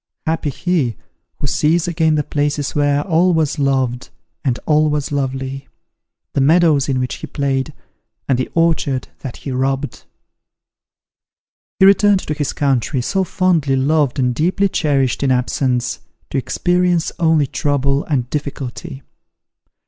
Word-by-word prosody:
Happy 160 -2 -1
he, 140 - -1 0.4
who - - -3
sees 160 +4 +1
again 160 -2 +2
the 150 - +1
places 145 0 -1
where 145 0 +1
all 175 0 +2
was 155 -2 0
loved, 130 -3 0 0.3
and 130 -4 0
all 155 0 +3
was 150 -1 -2
lovely! 135 -1 -3 0.7
the 140 - +1
meadows 150 -1 +4
in 130 -1 +1
which 125 0 -2
he - - -7
played, 135 -2 -1 0.6
and 130 -2 +1
the 130 - -2
orchard 160 -6 +1
that 130 -4 -7
he 140 - -6
robbed!" 135 +1 -2 1.7
He 190 - +7
returned 200 0 +5
to 150 - -3
this 145 -1 -2
country, 135 -2 0
so 190 +8 0
fondly 170 -7 +1
loved 145 +1 +1
and 125 -2 +1
deeply 185 +8 +1
cherished 140 -8 0
in 140 - +1
absence, 125 -1 0 0.3
to - - -1
experience 175 +4 +1
only 160 -3 +3
trouble 140 0 0
and 130 -6 -1
difficulty. 135 -2 -5
145 Hz, 140 wpm, -18 LUFS, 135-160 Hz, 1.7 s, He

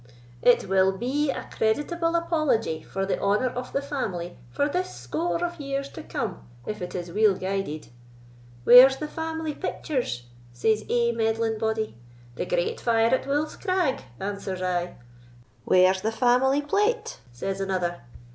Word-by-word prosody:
It 245 - +4
will 190 0 +3
be 275 +7 0
a - - -3
creditable 330 +9 0
apology 310 - +1
for 195 0 -3
the 195 - -1
honour 210 +6 +2
of 250 +1 -6
the 275 - -1
family 195 -12 -4
for 285 - 0
this 360 +5 -2
score 155 - -2
of 345 -1 -5
years 275 -1 -3
to - - -9
come, 275 - -4 0.2
if 210 -2 -5
it 180 0 -5
is 175 -1 -4
weel 210 +1 +4
guided. 185 -10 -3 0.7
'Where's 255 - +9
the 305 - -4
family 320 0 -4
pictures?' 255 - -3 0.3
says 215 - +1
ae 235 -1 +2
meddling 225 -1 0
body. 220 - -1 0.4
'The 150 - -4
great 175 0 -1
fire 230 0 +3
at 260 - +1
Wolf's 295 +2 0
Crag,' 370 -9 0 0.2
answers 195 -2 -4
I. 180 -1 -1 0.7
'Where's 185 +1 +4
the 220 - 0
family 250 +5 +3
plate?' 420 +10 0
says 195 +11 -4
another. 180 -3 -1
225 Hz, 150 wpm, -26 LUFS, 185-285 Hz, 0.7 s, Where's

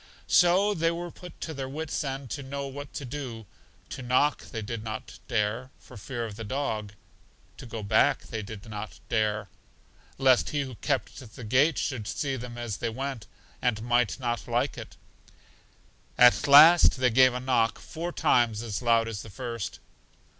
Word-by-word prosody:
So 185 +4 +4
they 165 -2 +1
were 170 +1 -4
put 180 0 -12
to 160 - -4
their 135 -2 -5
wits' 155 +2 -3
end 135 -2 -5
to 145 - -3
know 140 +1 -5
what 140 +1 -7
to 140 - -4
do: 125 -4 -6 0.4
to - - -6
knock 130 +4 +2
they 110 -3 -6
did 110 +1 -5
not 110 -1 -7
dare, 115 +2 -1
for 125 - -16
fear 120 +2 -5
of 105 -2 -8
the 115 - -6
dog; 110 -4 -3 0.6
to - - -10
go 115 -2 -6
back 100 - +3
they 110 - -5
did 105 +1 -9
not 105 0 -7
dare, 105 -2 0 0.7
lest 130 -2 +4
He 145 - -1
who 130 -2 -5
kept 130 -1 -3
the 125 - -9
gate 135 +8 +3
should 120 -7 -2
see 135 +6 -2
them 120 -1 -7
as 120 -4 -4
they 115 - -2
went, 130 0 -5 0.3
and 110 -3 0
might 120 -1 +1
not 120 -3 -3
like - - 0
it. - - -10 1.2
At 125 +2 +6
last 155 +3 +8
they 125 -2 +3
gave 130 +1 +5
a - - -1
knock 125 -3 +1
four 170 +1 -6
times 115 -8 +2
as 110 -2 -4
loud 115 -2 +3
as 110 -3 -5
the 110 - -10
first. 115 0 -5
125 Hz, 180 wpm, -27 LUFS, 110-140 Hz, 1.2 s, last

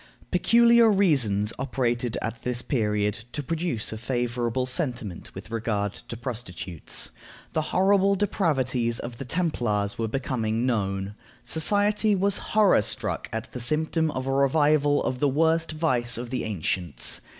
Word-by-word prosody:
Peculiar 235 0 +5
reasons 125 - +3
operated 120 -2 -1
at 115 +1 -4
this 120 -1 -2
period 105 -3 0
to 145 - -3
produce 160 -8 -1
a 110 - -6
favorable 120 0 -1
sentiment 125 - -3
with - - -9
regard 105 -3 -1
to 115 - -9
prostitutes. 95 - -5 0.4
The 160 - +1
horrible 195 +1 +3
depravities 130 - 0
of 120 -1 -7
the 135 - -5
Templars 120 - -1
were 115 - 0
becoming 115 -2 -1
known. 100 -4 -1 0.3
Society 205 +5 +2
was 200 +1 +1 0.2
horror 210 - +5
struck - - -2
at 110 +1 -5
the 125 - -6
symptom 155 +5 +1
of 130 -3 -4
a 135 - -1
revival 145 +1 +3
of 125 - -2
the 145 - +3
worst 160 +4 +2
vice 125 -7 0
of 120 0 -6
the 130 - -2
ancients. 90 - -1
125 Hz, 140 wpm, -26 LUFS, 115-160 Hz, 0.4 s, Peculiar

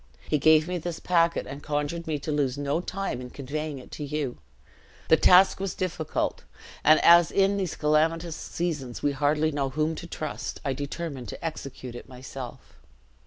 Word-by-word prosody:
He 150 - +1
gave 155 +2 +5
me 180 0 -2
this 170 0 -5
packet, 170 -1 +2
and 140 +2 -8
conjured 150 +3 -2
me 155 -2 0
to 155 - -3
lose 140 -3 0
no 145 +3 0
time 190 -7 -3
in 125 - -7
conveying 145 +3 -4
it 130 - -12
to 150 - -6
you. 145 -3 -3 0.7
The - - +8
task 185 +4 +6
was 195 -2 -3
difficult; 165 -4 -2 0.4
and, 155 +1 +7
as 170 0 +7
in 195 0 +2
these 185 -4 -2
calamitous 160 +2 +1
seasons 150 -10 -4
we 145 - +3
hardly 150 +2 +1
know 140 -2 -1
whom 155 +3 0
to 170 - -7
trust, 155 -3 -5
I 135 - +1
determined 140 -1 -5
to 100 - -7
execute 135 -5 -6
it 120 - -10
myself.' 130 0 -9
155 Hz, 175 wpm, -27 LUFS, 140-170 Hz, 0.7 s, The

